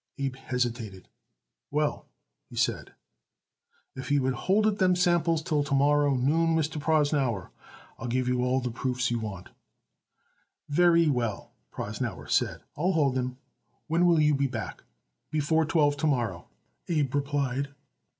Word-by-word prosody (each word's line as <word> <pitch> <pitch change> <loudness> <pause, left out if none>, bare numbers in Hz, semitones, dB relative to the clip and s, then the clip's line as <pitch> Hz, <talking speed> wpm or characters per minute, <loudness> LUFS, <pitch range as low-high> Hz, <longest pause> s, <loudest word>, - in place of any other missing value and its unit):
Abe 135 -2 -2
hesitated. 120 -7 -3 0.6
"Well," 150 +1 -1 0.4
he - - -11
said, - - -1 1.0
"if 130 +2 -6
you 145 -2 +2
would 130 0 +1
hold 195 - +1
it 210 -1 +1
them 185 -1 +4
samples 170 -2 +2
till 150 -2 +1
to 145 -1 -1
morrow 145 0 +3
noon, 160 +6 +2
Mr. 155 -1 -1
Prosnauer, 145 - +1 0.5
I'll 125 - -5
give 125 +1 0
you 125 0 +1
all 130 +1 +1
the 125 -1 -3
proofs 125 0 -1
you 120 - 0
want." 95 -5 -6 1.2
"Very 170 +2 +4
well," 120 -7 -1 0.2
Prosnauer - - -5
said, - - +1
"I'll 180 +6 +1
hold 145 -5 +2
them. 125 -1 -2 0.5
When 170 +2 +2
will 170 -2 +4
you 150 -1 +4
be 140 0 +1
back?" 125 - -6 0.5
"Before 155 +1 +1
twelve 150 -3 +2
to 155 - 0
morrow," 115 - -1 0.4
Abe 145 -5 0
replied. 140 -1 -1
145 Hz, 145 wpm, -28 LUFS, 125-160 Hz, 1.2 s, them